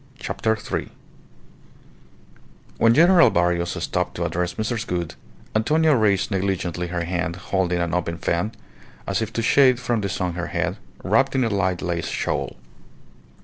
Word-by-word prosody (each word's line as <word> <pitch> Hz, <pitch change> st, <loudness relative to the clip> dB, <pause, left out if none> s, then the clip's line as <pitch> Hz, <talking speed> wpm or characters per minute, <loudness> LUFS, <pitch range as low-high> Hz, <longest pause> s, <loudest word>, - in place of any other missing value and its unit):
CHAPTER 110 Hz, -4 st, -1 dB
THREE 110 Hz, -, -4 dB, 1.9 s
When 115 Hz, 0 st, +5 dB
General 170 Hz, +2 st, +7 dB
Barrios 85 Hz, 0 st, 0 dB
stopped -, -, -2 dB
to -, -, -2 dB
address 90 Hz, 0 st, -2 dB
Mrs. 115 Hz, +2 st, -2 dB
Gould, 85 Hz, -2 st, -3 dB, 0.4 s
Antonia 155 Hz, +7 st, +3 dB
raised 105 Hz, -5 st, +2 dB
negligently 90 Hz, -3 st, -1 dB
her 85 Hz, 0 st, -2 dB
hand 85 Hz, -1 st, -2 dB
holding 90 Hz, -1 st, -1 dB
an 85 Hz, -1 st, -1 dB
open 85 Hz, -2 st, -1 dB
fan, 85 Hz, +5 st, -1 dB, 0.5 s
as 95 Hz, +2 st, -1 dB
if 110 Hz, 0 st, -3 dB
to 115 Hz, -, -1 dB
shade 130 Hz, 0 st, +5 dB
from 120 Hz, -2 st, -1 dB
the 100 Hz, -, -2 dB
sun 90 Hz, -1 st, -2 dB
her 85 Hz, 0 st, -4 dB
head, -, -, -2 dB, 0.3 s
wrapped 130 Hz, +7 st, +2 dB
in 130 Hz, -, +3 dB
a 115 Hz, -, +1 dB
light 95 Hz, -3 st, 0 dB
lace 85 Hz, -2 st, -2 dB
shawl. -, -, -2 dB
95 Hz, 150 wpm, -23 LUFS, 85-115 Hz, 1.9 s, General